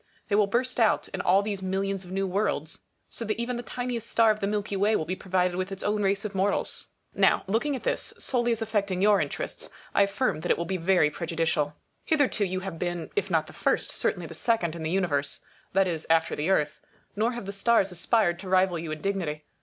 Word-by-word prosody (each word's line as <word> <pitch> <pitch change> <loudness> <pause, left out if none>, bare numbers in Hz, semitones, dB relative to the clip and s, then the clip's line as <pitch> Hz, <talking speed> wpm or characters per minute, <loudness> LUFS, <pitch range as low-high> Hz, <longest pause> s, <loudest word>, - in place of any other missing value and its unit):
They 205 - +2
will 205 -1 +4
burst 250 +4 0
out 225 -2 +3
in 190 - -4
all 190 +3 +4
these 200 -2 -3
millions 195 +1 -1
of 180 - -12
new 195 +1 0
worlds, 180 -5 -1 0.3
so - - -5
that 220 0 -2
even 240 +1 -1
the 240 - -3
tiniest 245 -1 -4
star 225 -1 +5
of 215 - -2
the 200 - -1
milky 205 -1 -2
way 205 +3 +3
will 155 - 0
be 185 - -2
provided 180 -1 0
with 185 +1 -2
its 195 - -6
own 210 0 +1
race 195 +1 +1
of 210 - -4
mortals. 195 +1 0 0.3
Now, - - +3
looking 235 +9 0
at 260 - -6
this, - - -1
solely 240 -2 0
as 225 -1 0
affecting 200 -4 0
your 205 -1 +5
interests, - - -4 0.2
I - - +4
affirm 200 -1 +1
that 175 - -4
it - - +4
will 170 - -2
be 190 +1 -1
very 175 -3 +3
pre 170 - -5
judicial. 160 -3 0 0.3
Hitherto 285 -9 +2
you 185 0 -2
have 185 -4 -6
been, 175 -2 -3
if 415 - 0
not - - +2
the - - -13
first, - - 0
certainly - - -1
the - - -8
second 200 -9 0
in 170 - -6
the 160 - -2
Universe; 165 -6 0 0.3
that 195 0 +4
is, 165 -3 -3
after 160 0 +3
the 150 +5 -1
Earth; 150 -6 +1 0.3
nor 225 +4 +1
have 235 -4 -6
the 200 - -4
stars 200 -1 +2
aspired 175 0 +1
to 190 -1 -7
rival 185 -2 +3
you 160 -1 -5
in 155 0 -5
dignity. 170 -7 -2
195 Hz, 235 wpm, -27 LUFS, 175-215 Hz, 0.3 s, star